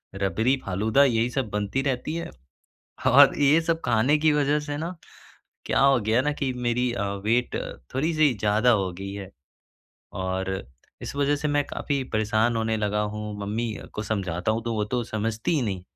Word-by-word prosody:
रबड़ी-फ़ालूदा 110 +3 +1
यही 115 -2 +1
सब 130 -4 -2
बनती 105 +6 -1
रहती 135 +3 -2
है 170 - -4 0.8
और - - +7
ये 145 +3 +5
सब 165 0 -1
खाने 125 +7 +3
की 155 0 +3
वजह 145 0 +2
से 145 -1 -5
ना 170 +4 -4 0.7
क्या - - +1
हो 135 -1 +5
गया 110 +4 +2
ना 150 +2 0
कि 140 -3 -2
मेरी 125 0 0
अ, 110 - -2 0.2
वेट 120 +3 +1 0.4
थोड़ी-सी 155 +1 +2
ज़्यादा 105 +3 +2
हो 95 -6 +1
गई 100 +2 -7
है। 100 -2 -7 0.9
और 95 0 -2 0.5
इस - - -6
वजह 145 +1 +2
से 150 +1 -2
मैं 145 0 +2
काफ़ी 140 -2 -2
परेशान 110 +2 +1
होने 110 0 0
लगा 105 -1 0
हूँ, 105 0 -4
मम्मी 110 +3 -2 0.2
को 105 - -3
समझाता 95 -3 -1
हूँ 115 +1 -2
तो 115 - -2
वो 105 - 0
तो 120 +3 -2
समझती 110 +5 -2
ही 150 - +2
नहीं, 95 -5 -3
115 Hz, 175 wpm, -25 LUFS, 105-140 Hz, 0.9 s, और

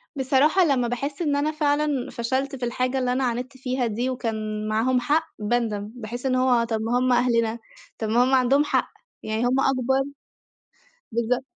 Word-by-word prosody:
بصراحة 280 +7 +3
لمّا 260 -6 +2
باحس 280 +6 -4
إن 295 -4 +1
أنا 290 +2 +1
فعلًا 295 -3 0
فشَلت 260 +4 -2
في 250 -2 -3
الحاجة 255 +2 -1
اللي 250 -1 0
أنا 265 +1 0
عاندت 250 +2 -3
فيها 255 -1 -1
دي 235 +4 -2
وكان 215 -4 -3
معاهم 230 +4 +2
حق 305 +6 +1
باندَم. 210 -2 -1
باحس 240 +2 -7
إن 260 -1 +2
هو 255 -2 +3
طَب 225 -1 -2
ما 230 +2 0
هُم 255 0 +2
أهلنا، 235 -2 +2 0.4
طَب 220 - -3
ما 235 +3 +4
هُم 260 +1 +1
عَندهم 265 +3 +4
حق، 295 - 0 0.3
يعني 220 +1 -2
هُم 255 +2 +2
أكبر 265 0 +2 1.1
بالضبط. 235 +3 0
250 Hz, 175 wpm, -24 LUFS, 235-270 Hz, 1.1 s, ما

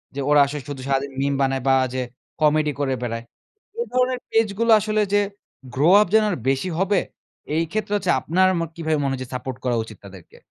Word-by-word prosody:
যে 140 - -4
ওরা 150 - +5
আসলে 145 +1 -5
শুধু 135 -2 -6
সারাদিন 135 0 0
meme 140 0 0
বানায় 135 -1 +1
বা 135 - +5 0.2
যে 130 - -1 0.4
comedy 150 0 +3
করে 135 -2 0
বেড়ায়। 115 -1 -3 0.6
এ - - +1
ধরনের 255 0 +1
page 225 -2 +2
গুলো 230 0 +3
আসলে 215 +1 0
যে 205 - +5 0.5
grow 155 +8 +4
up 210 - +2
যেন 220 0 +6
আর 180 - -1
বেশি 135 +7 0
হবে। 195 0 +2 0.6
এই 165 - +2
ক্ষেত্রে 215 -1 -2
হচ্ছে 180 -3 0
আপনার 185 +4 +2
ম - - -1
কিভাবে 160 -2 -1
মনে 135 -1 0
হচ্ছে 130 -1 -5
support 125 0 -5
করা 125 -2 0
উচিত 110 -2 -12
তাদেরকে? 95 -3 -14
150 Hz, 205 wpm, -22 LUFS, 135-195 Hz, 0.6 s, যেন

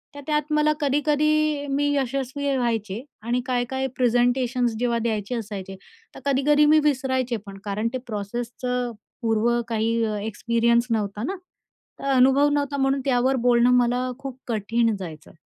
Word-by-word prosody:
तर 285 - -7
त्यात 300 0 0
मला 300 0 +3
कधी-कधी 295 +1 +1
मी 285 +1 +1
यशस्वी 275 +1 -1
व्हायचे 225 -2 -2 0.2
आणि 245 +2 0
काय-काय 260 +1 -1
प्रेझेंटेशन्स 245 0 +2
जेव्हा 235 -1 +1
द्यायचे 220 0 -2
असायचे 200 -4 -6 0.4
तर - - -8
कधी-कधी 290 +2 +3
मी 305 +1 +6
विसरायचे 260 -3 0
पण, 195 -1 -9
कारण 210 +2 -1
ते 255 - 0
प्रोसेसचं 240 +3 -3 0.3
पूर्व 225 0 +1 0.2
काही 230 0 0
अ, 215 - -2
एक्सपिरियन्स 235 +3 +1
नव्हता 210 -1 -1
ना. 380 +10 -2 0.6
तर - - -7
अनुभव 270 +3 +5
नव्हता 285 -1 -1
म्हणून 270 0 +1
त्यावर 260 0 +2
बोलणं 240 0 +5
मला 245 +1 +1
खूप 270 -2 -7
कठीण 230 0 +1
जायचं 160 -5 -9
245 Hz, 145 wpm, -24 LUFS, 230-275 Hz, 0.6 s, मी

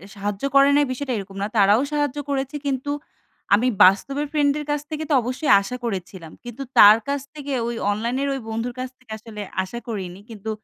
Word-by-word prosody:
সাহায্য 205 +1 -4
করে 275 0 +7
নাই 290 0 +4
বিষয়টা 255 0 -3
এরকম 195 0 -8
না। 200 - 0
তারাও 205 +4 +5
সাহায্য 290 -1 -1
করেছে 275 +1 -2
কিন্তু 275 +1 -2 0.6
আমি 235 +5 +4 0.2
বাস্তবের 275 +11 +3
ফ্রেন্ড 290 -2 +2
এর 295 - -6
কাছ 295 -1 -1
থেকে 310 0 -3
তো - - +2
অবশ্যই 255 +5 -1
আশা 200 +5 -5
করেছিলাম। 185 -5 -5
কিন্তু 240 +3 -7
তার 210 +1 +10
কাছ 280 -1 -1
থেকে 290 -2 -7 0.2
ওই 235 - -3 0.2
অনলাইনের 240 +6 -1
ওই 270 - -3
বন্ধুর 230 +2 -3
কাছ 255 0 -3
থেকে 250 -4 -17
আসলে 215 -1 -9 0.2
আশা 235 +6 -7
করিনি। 190 -4 -5
কিন্তু 220 -1 -7
245 Hz, 190 wpm, -22 LUFS, 205-280 Hz, 0.6 s, তার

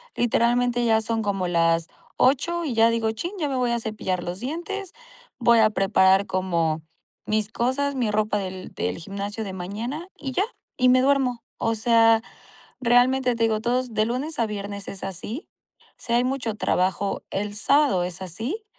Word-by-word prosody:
literalmente 240 +1 +2
ya 220 -1 +3
son 225 0 -1
como 195 -3 -1
las 165 -1 +2 0.3
8 340 +6 +2
y 275 - -2
ya 225 0 +5
digo: 230 -1 0
"Chin, 285 - -4
ya 300 -3 0
me 270 - -2
voy 250 -2 +1
a 235 - 0
cepillar 210 -5 -3
los 175 +2 -5
dientes". 345 - -5 0.5
Voy 235 -1 +5
a 215 -1 +6
preparar 195 -1 +4
como 170 -4 0 0.4
mis 215 -1 0
cosas, 260 +5 -1
mi 240 -5 0
ropa 210 0 +1
del 185 -1 -6
del 90 +1 -2
gimnasio 200 +4 -5
de 195 -3 -6
mañana 220 - -5
y 275 -3 -5
ya 380 - +2 0.3
y 255 -2 +4
me 255 0 +5
duermo. 265 -3 +1
O 225 - 0
sea, 225 0 +4 0.6
realmente 245 +1 +3
te 230 - 0
digo, 220 -1 +2
todos 245 +1 -1
de 215 0 +2
lunes 270 +7 -3
a 230 - +3
viernes 200 -1 -6
es 195 - -7
así. 195 - -5 0.5
Sí, 235 - -4
hay 240 +1 +4
mucho 250 -3 -1
trabajo, 190 -1 0
el 205 +1 -3
sábado 275 -4 +3
es 180 +1 -5
así, 230 - -4
225 Hz, 175 wpm, -24 LUFS, 200-255 Hz, 0.6 s, a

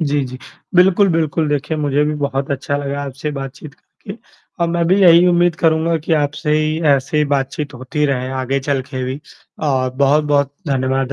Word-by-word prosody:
जी, 145 -2 0
जी, 130 0 -8 0.4
बिल्कुल, 190 +2 +5
बिल्कुल 160 -2 0
देखिए 150 +2 -1
मुझे 145 -1 +1
भी 150 0 -1
बहुत 140 0 -2
अच्छा 140 +1 -2
लगा 140 0 -3
आपसे 140 +2 -5
बातचीत 140 +1 -8
करके 200 +6 -12 0.5
और 170 - +1
मैं 170 0 0
भी 185 +3 +3
यही 175 0 +7
उम्मीद 175 -1 +3
करूँगा 165 0 +1
कि 160 +2 -3
आपसे 150 +1 -1
ही 155 +1 0
ऐसे 135 +3 -2
ही 150 - +3
बातचीत 140 +2 -3
होती 130 +4 -3
रहे, 130 -2 -1
आगे 130 +1 -2
चल 135 -1 -1
के 130 -2 -3
भी। 130 +3 -5 0.5
और 130 -2 0
बहुत-बहुत 140 0 +2 0.2
धन्यवाद 135 0 0
145 Hz, 185 wpm, -18 LUFS, 135-160 Hz, 0.5 s, यही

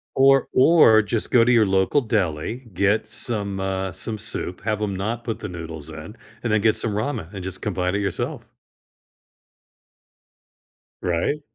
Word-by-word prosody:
Or 135 0 +4
or 130 -6 +6
just 105 +1 -2
go 115 -2 +5
to 125 - +3
your 115 -3 +5
local 95 +8 +2
deli, 110 - -2
get 100 +4 +1
some, 105 -3 -1
uh 95 -1 -2
some 110 +5 -2
soup, 90 -3 -2
have 110 -1 -1
‘em 100 -2 -1
not 110 +5 -3
put 115 -2 -4
the 105 - -5
noodles 80 -3 -8
in, 80 +8 -10 0.3
and 120 - -1
then 110 - +3
get 110 +1 +3
some 115 - 0
ramen, 110 - -3
and 95 - -6
just 95 0 -3
combine 95 -2 -1
it - - 0
yourself. 95 -3 -2 2.6
Right. 90 - -1
105 Hz, 160 wpm, -22 LUFS, 95-115 Hz, 2.6 s, or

